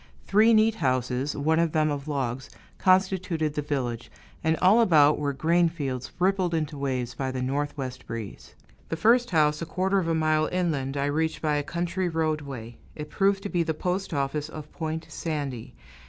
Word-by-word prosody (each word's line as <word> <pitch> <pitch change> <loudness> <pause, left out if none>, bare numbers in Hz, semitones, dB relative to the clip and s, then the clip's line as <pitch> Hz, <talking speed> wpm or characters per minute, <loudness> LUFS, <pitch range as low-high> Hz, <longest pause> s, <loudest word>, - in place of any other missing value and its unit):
Three 215 +3 +5
neat 220 0 +5
houses, 130 +1 0
one 160 +3 +2
of 170 -2 +1
them 155 -1 +2
of 145 0 -4
logs, 135 -3 -3 0.3
constituted 185 -5 +2
the 150 - -2
village, 125 -5 -3 0.3
and 160 0 +2
all 200 +6 +5
about 155 -8 +5
were 145 -1 0
grain 165 +5 +2
fields 130 -6 -4
rippled 185 -1 +1
into 155 -2 -2
waves 130 -3 -2
by 135 -1 -3
the 130 0 -3
northwest 135 -1 -3
breeze. 115 -3 -7 0.3
The - - -2
first 240 +7 +4
house, 150 -3 +2
a - - -2
quarter 190 +3 +1
of 175 - -2
a 165 - +1
mile 155 -1 +2
inland, 145 -7 -1
I 140 - 0
reached 160 +3 -1
by 150 -1 +2
a - - +1
country 175 +4 -2
roadway; 145 -8 -3 0.2
it 150 0 -7
proved 195 0 +1
to 205 - -4
be 175 -3 +1
the 160 -1 -1
postoffice 155 -5 -2
of 155 -1 -9
Point 160 0 -4
Sandy. 145 -8 -5
155 Hz, 180 wpm, -26 LUFS, 140-175 Hz, 0.3 s, Three